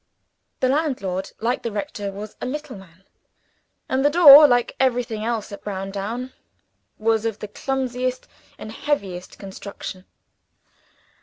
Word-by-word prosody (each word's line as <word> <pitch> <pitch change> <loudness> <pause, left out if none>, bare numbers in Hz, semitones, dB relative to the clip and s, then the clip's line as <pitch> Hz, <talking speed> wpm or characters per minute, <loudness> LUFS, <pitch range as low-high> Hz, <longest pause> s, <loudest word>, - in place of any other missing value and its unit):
The 255 - +3
landlord, 255 - -1
like 240 +3 0
the 230 - -4
rector, 205 -1 -4
was 205 +2 -8
a - - -3
little 295 0 -5
man; 190 -2 -16 0.8
and 265 +1 0
the 290 - +5
door, 300 -2 +10
like 245 -2 +1
everything 245 -4 0
else 225 -3 -2
at 200 - -9
Browndown, 205 +6 -5 0.6
was 220 0 +1
of 225 -2 -2
the 210 - -7
clumsiest 255 +2 -3 0.3
and 215 - -8
heaviest 200 -10 -3
construction. 195 -1 -8
225 Hz, 130 wpm, -22 LUFS, 200-260 Hz, 0.8 s, door